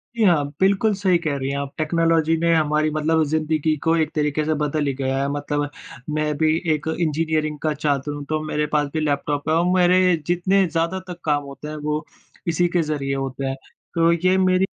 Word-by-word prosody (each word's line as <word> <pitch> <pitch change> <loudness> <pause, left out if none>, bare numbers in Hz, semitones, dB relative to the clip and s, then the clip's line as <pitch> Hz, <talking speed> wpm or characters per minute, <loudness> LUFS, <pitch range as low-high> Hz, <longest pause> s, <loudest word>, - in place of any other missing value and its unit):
जी, 230 - +1
हाँ। 170 -7 +4
बिल्कुल, 200 +3 +3
सही 190 -2 +2
कह 155 -4 0
रही 135 0 -3
हैं 140 - -2
आप, 140 -1 -4
टेक्नोलॉज़ी 165 0 +2
ने 170 +1 +2
हमारी 155 0 +2
मतलब 155 +1 +1
ज़िंदगी 155 0 +1
को 165 0 +3
एक 160 -1 0
तरीके 150 0 0
से 155 - +1
बदल 150 0 0
ही 140 - 0
गया 135 0 -1
है। 140 - 0
मतलब 145 0 -2 0.4
मैं 150 0 0
भी 155 +1 +3 0.2
एक 150 0 -4
इंजीनियरिंग 155 -1 0
का 155 -1 +1
छात्र 145 -1 -1
हूँ 145 0 -6
तो 155 0 0
मेरे 150 -1 -1
पास 150 -1 +1
भी 160 - 0
लैपटॉप 145 0 -1
है 160 - +3
और 170 +1 +2
मेरे 180 0 +4
जितने 185 +3 +2
ज़्यादातर 170 +3 -2
काम 145 -2 +1
होते 140 +1 -9
हैं 155 - -5
वो 150 +1 -1 0.4
इसी 170 +1 +2
के 175 - +4
ज़रिए 145 -3 -2
होते 135 0 -3
हैं, 135 0 -2 0.4
तो 165 0 +4
ये 185 +2 +2
मेरी 185 0 +3
155 Hz, 205 wpm, -22 LUFS, 145-170 Hz, 0.4 s, हाँ